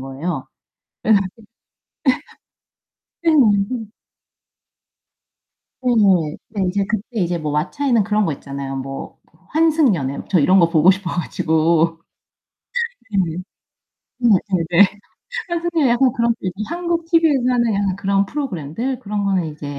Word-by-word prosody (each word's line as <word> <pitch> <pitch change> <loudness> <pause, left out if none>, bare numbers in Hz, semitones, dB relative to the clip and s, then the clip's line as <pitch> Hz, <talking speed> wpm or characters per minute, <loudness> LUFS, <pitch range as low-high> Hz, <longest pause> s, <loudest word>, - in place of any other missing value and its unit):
거예요. 135 +6 -4 0.6
그래 220 - +4 1.9
가지고 305 - +3
예. 255 - -4
네. 225 - -6 2.0
네. 250 - +2 0.6
네. 205 -2 -2
이제 195 +2 0
그때 215 -1 -1 0.2
이제 175 0 0
뭐 155 -1 -3
WATCHA에는 230 - +1
그런 210 0 +1
거 165 - 0
있잖아요. 140 0 -6
뭐 135 +1 -7 0.3
환승연애 285 - +2
저 185 - +3
이런 185 +6 +5
거 170 -1 +4
보고 165 +2 +5
싶어 190 -2 -3
가지고 165 -1 +1 1.1
네. 180 -6 0 0.8
네네네. 195 -5 +3 0.6
환승연애 340 -4 0
약간 250 +1 +3
그런 235 0 +1
삘. 185 - -2 0.2
한국 340 0 -2
TV에서 325 -6 +3
하는 235 -3 +2
약간 195 -1 0
그런 200 0 +1
프로그램들 235 - -3
그런 205 -1 -3
거는 190 -4 +1
이제 145 -1 -7
200 Hz, 260 characters per minute, -20 LUFS, 165-250 Hz, 2.0 s, 이런